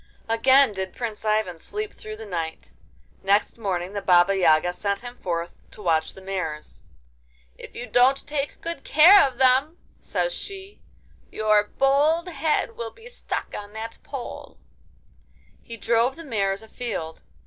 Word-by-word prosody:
Again 260 +3 +5
did 190 -1 -5
Prince 225 -3 -5
Ivan 215 -5 0
sleep 420 - -5
through 215 0 -9
the 220 - -9
night. 165 -5 -5 0.5
Next 200 +4 +1
morning 185 -3 -2
the 200 - -3
Baba 180 +1 +4
Yaga 175 -1 +3
sent 200 +2 -2
him 245 0 -9
forth 170 -4 -4
to - - -14
watch 160 -3 +1
the 190 - -12
mares. 180 -6 -5 0.7
'If - - -12
you 245 - -5
don't 255 +3 +3
take 290 -1 -3
good 335 -4 -5
care 355 +7 +7
of 255 -2 -9
them,' 265 +5 +3 0.2
says - - -2
she, 390 0 -8 0.5
'your 215 -1 +2
bold 300 +6 +3
head 320 - -1
will 475 +1 -5
be 460 0 -15
stuck - - -5
on 205 0 -8
that 225 +1 -7
pole!' 270 -4 -8 1.0
He 230 - -9
drove 235 +4 +1
the 330 - -10
mares 200 -5 -1
afield. 220 -8 -5
225 Hz, 150 wpm, -24 LUFS, 195-275 Hz, 1.0 s, care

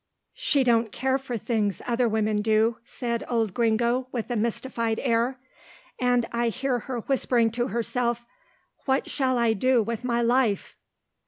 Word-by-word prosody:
"She 295 - +2
don't 230 -3 +2
care 265 +3 0
for 250 -3 -4
things 210 -3 -1
other 240 0 +1
women 215 -1 +1
do," 220 +2 +2
said 235 -1 -3
old 225 -5 0
Gringo 235 +3 +1
with 240 0 -4
a - - 0
mystified 230 0 -1
air, 240 +1 +1 0.6
"and 245 -1 +2
I 235 0 0
hear 255 +1 -1
her 245 0 -5
whispering 240 -3 +1
to 240 +2 -1
herself, 235 +2 -1 0.6
'What 265 0 +1
shall 260 -3 0
I 235 -2 +3
do 245 +2 +3
with 230 +2 -4
my 240 -1 +1
life? 235 -3 +1
235 Hz, 155 wpm, -26 LUFS, 225-250 Hz, 0.6 s, I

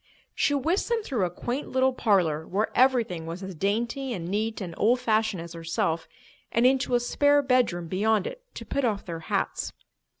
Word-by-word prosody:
She 285 - +1
whisked 325 - 0
them 465 -2 0
through 240 - 0
a - - -1
quaint 245 +10 -4
little 260 0 +2
parlour, 175 -10 +1
where 210 +4 0
everything 235 -11 +2
was 170 +4 -6
as 190 0 -6
dainty 235 - -1
and 170 -5 -5
neat 215 +4 -1
and 180 -5 -5
old 240 +4 +3
fashioned 220 -5 +1
as 170 0 -9
herself, 165 0 -2 0.4
and 235 +2 +2
into 260 -1 +3
a - - +4
spare 285 +4 +3
bedroom 245 -10 +1
beyond 205 +3 +1
it, - - -6
to - - -7
put 280 - -1
off 210 -5 0
their 170 -2 -5
hats. 160 - -2
220 Hz, 190 wpm, -27 LUFS, 180-255 Hz, 0.4 s, a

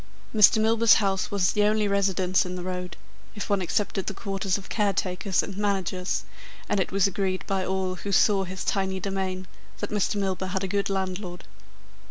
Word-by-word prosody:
Mr. 215 0 +6
Milburgh's 225 +1 +5
house 195 -3 0
was 195 -3 +2
the 210 - +1
only 210 0 +2
residence 190 -2 +2
in 180 0 -5
the 180 - -5
road, 180 0 -5 0.4
if 210 - -5
one 200 -1 +2
excepted 195 +1 -1
the 200 - -3
quarters 195 -2 -1
of 195 - -10
caretakers 195 -2 0
and 195 - -6
managers, 190 -2 -1 0.4
and 205 - +1
it 190 - -1
was 195 0 +3
agreed 190 -1 -1
by 195 -1 -1
all 190 0 -1
who 200 - -5
saw 195 0 +4
his 185 0 -6
tiny 190 -1 0
demesne, 190 -1 -3 0.3
that - - -5
Mr. 210 -1 0
Milburgh 190 -2 -1
had 190 0 -2
a - - -1
good 200 +1 0
landlord. 185 -2 -3
195 Hz, 185 wpm, -26 LUFS, 185-200 Hz, 0.4 s, Mr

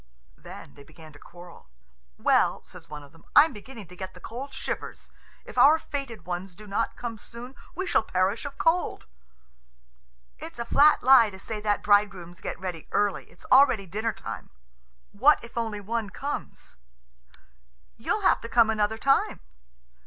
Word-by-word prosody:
Then - - -12
they 140 - -15
began 155 +1 -15
to 145 - -15
quarrel. 175 - -14 0.5
"Well," - - +2
says - - -12
one 150 -1 -8
of 140 - -16
them, 165 - -20
"I'm 295 0 +7
beginning 220 0 -10
to 180 - -12
get 185 0 -8
the - - -12
cold 255 +8 -7
shivers. - - -6 0.3
If - - -4
our 305 +3 +7
fated 275 - -6
ones 180 +1 -5
do 215 - -13
not 205 +3 -2
come 230 -3 -6
soon, 240 +4 -10 0.2
we 375 +3 -2
shall 345 - +2
perish 190 +1 0
of 280 -1 -7
cold." 335 +2 0 1.3
"It's 165 - -9
a 235 - -4
flat 295 +5 +5
lie 255 -4 +7
to 190 - -11
say 215 +3 -5
that 210 -1 0
bridegrooms 200 -5 +1
get - - -5
ready 180 -4 -6
early. 205 -1 0
It's - - -18
already 255 -7 +6
dinner 215 +6 -2
time." - - -8 0.6
"What 270 +9 +5
if 235 - -12
only 225 -3 -2
one 220 +1 -3
comes?" 280 - -7 1.2
"You'll - - -1
have - - +3
to 230 - -7
come 230 -2 +4
another 215 0 0
time." 275 +4 +2
215 Hz, 165 wpm, -26 LUFS, 185-245 Hz, 1.3 s, I'm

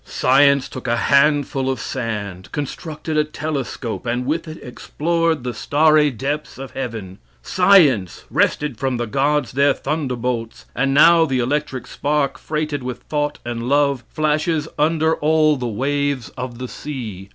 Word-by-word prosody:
Science 140 +1 +3
took 130 - -8
a 120 0 +1
handful 140 0 +2
of 130 -3 -2
sand, 105 -8 -5
constructed 155 +2 -5
a 150 - +4
telescope, 140 -6 -4
and 120 +1 -1
with 160 +4 -2
it 155 0 -7
explored 165 +3 -1
the 125 -1 -3
starry 150 +2 +3
depths 140 +4 -4
of 135 0 -8
heaven. 110 -8 -6 0.2
Science 160 - +4
wrested 145 -6 0
from 130 -2 -1
the 120 - -2
gods 140 +3 0
their 140 +1 +3
thunderbolts; 125 -6 -3
and 135 0 +1
now, 165 +3 +7
the 135 -5 0
electric 130 +1 -1
spark 140 -2 -1
freighted 150 -2 -3
with 125 -1 -6
thought 150 -1 -2
and 120 0 -4
love, 140 -2 +2
flashes 155 0 0
under 160 +1 +2
all 155 0 +3
the 125 -3 -3
waves 140 +2 -1
of 125 -2 -7
the 125 +1 -5
sea. 110 -10 -7
140 Hz, 150 wpm, -20 LUFS, 125-150 Hz, 0.2 s, now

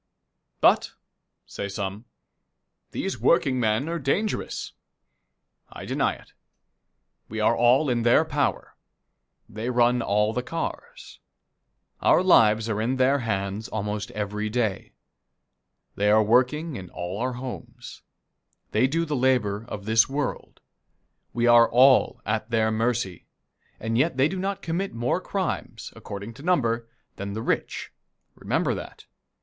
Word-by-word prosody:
"But," - - +4 0.5
say 100 - -6
some, 100 +2 -5 0.8
"these 195 - -4
workingmen 130 -5 +2
are 170 0 -2
dangerous." 195 +10 -2 1.0
I - - -9
deny - - 0
it. - - -18 1.0
We 110 - -5
are 110 +2 +3
all 125 +6 +4
in 120 -2 +1
their 120 +1 +4
power. - - -2 0.7
They 110 +4 -5
run 120 0 +3
all 105 +1 +1
the 125 - -1
cars. 475 - -6 0.8
Our - - +4
lives 110 -10 +5
are 110 -1 -1
in 125 +4 0
their 130 +2 +3
hands 100 -2 -3
almost 105 -1 -3
every 105 0 -3
day. 110 -4 -2 1.0
They 105 +1 +1
are 110 +1 +5
working 130 +7 +1
in 90 -2 -9
all 90 +3 -5
our 125 +1 -1
homes. 120 -1 -8 0.7
They 115 +5 +3
do 165 +5 0
the 150 -2 -2
labor 120 -5 +1
of 100 -4 -7
this 110 +3 +4
world. 145 +1 -4 0.7
We 120 0 0
are 120 -1 +6
all 130 +2 +4
at 110 +1 -2
their 110 -1 +1
mercy, 110 -5 -1 0.5
and 115 +1 -2
yet 140 0 +1
they 135 +2 +4
do 185 +3 -4
not 195 +1 -3
commit 175 +1 -3
more 120 +2 0
crimes, - - -4
according 100 +3 -8
to 130 - -13
number, 120 -9 0 0.3
than 100 0 -5
the 110 +2 -4
rich. - - -2 0.4
Remember - - -1
that. - - -8
120 Hz, 135 wpm, -25 LUFS, 105-130 Hz, 1.0 s, are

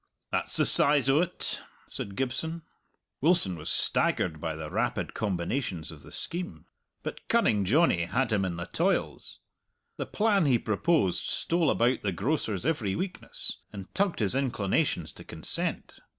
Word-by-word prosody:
"That's - - +1
the - - +5
size 140 -2 +5
o't," 170 +5 0 0.2
said 100 - -5
Gibson. 145 +7 -2 0.6
Wilson 150 - +3
was 80 -1 -6
staggered 80 -4 +2
by 80 -2 -2
the 80 -1 -6
rapid - - -1
combinations 95 - -2
of 75 -3 -12
the - - -13
scheme. 175 +1 -5 0.4
But - - -6
Cunning 110 - +3
Johnny 110 - +3
had 120 +6 0
him 100 -3 +2
in 90 -2 -2
the 85 0 -4
toils. - - -1 0.6
The - - -3
plan 205 -6 +2
he 130 -3 +5
proposed 110 - +1
stole 170 -1 +1
about 120 +2 +2
the 100 - 0
grocer's 110 - -1
every 115 -12 0
weakness, 185 -1 -3
and 100 -3 -9
tugged 200 -2 +1
his 105 0 +2
inclinations 125 -8 0
to - - -12
consent. - - -3
120 Hz, 150 wpm, -28 LUFS, -, 0.6 s, the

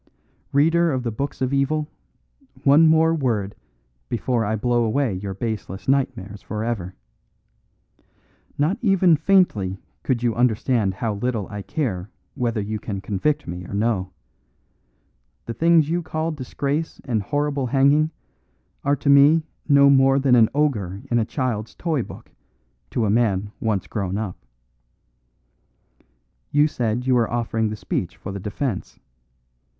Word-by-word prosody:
"Reader 165 +3 +3
of 130 -1 -2
the 120 - -2
books 135 +4 -4
of 130 +1 -1
evil, 150 +2 +1 0.8
one 150 +4 +6
more 160 +1 +4
word 115 -10 -1 0.6
before 120 0 0
I 110 +1 0
blow 120 +2 +1
away 115 +1 0
your 95 +1 -5
baseless 105 -3 -5
nightmares 105 -7 -1
for 110 0 -4
ever. 95 -6 -3 1.6
Not 165 +10 +1
even 195 -6 +4
faintly 145 - +2 0.2
could 125 -3 -1
you 120 -2 +2
understand 115 -3 +1
how 110 +2 -2
little 110 -1 -2
I 105 -1 -6
care 95 - -3 0.2
whether 120 -2 -1
you 105 +1 -3
can 100 -2 -5
convict 105 +10 -1
me 90 +1 -5
or - - -6
no. 100 -3 0 1.4
The 115 - -4
things 165 +1 +4
you 170 +2 0
call 160 0 -2
disgrace 145 +2 -3
and 115 -5 0
horrible 145 +3 -1
hanging 140 +4 +3 0.7
are 140 +1 +2
to 140 - -7
me 145 +3 +6 0.3
no 140 -1 +7
more 135 0 +5
than 135 -2 +2
an 115 -3 +6
ogre 105 -11 0
in 120 - +3
a 110 - +1
child's 120 -4 -3
toy 160 -6 -1
book - - -10 0.6
to 115 - 0
a 100 - +1
man 105 -3 +1
once 110 -4 -1
grown 100 -2 -3
up. 105 -4 -3 2.1
You 145 +1 +4
said 120 -3 -2
you 130 - +3
were 120 -2 +2
offering 115 -2 -1
the 105 - -4
speech - - -4
for 95 - -7
the 100 - -5
defence. 105 +2 -4
120 Hz, 145 wpm, -22 LUFS, 105-145 Hz, 2.1 s, no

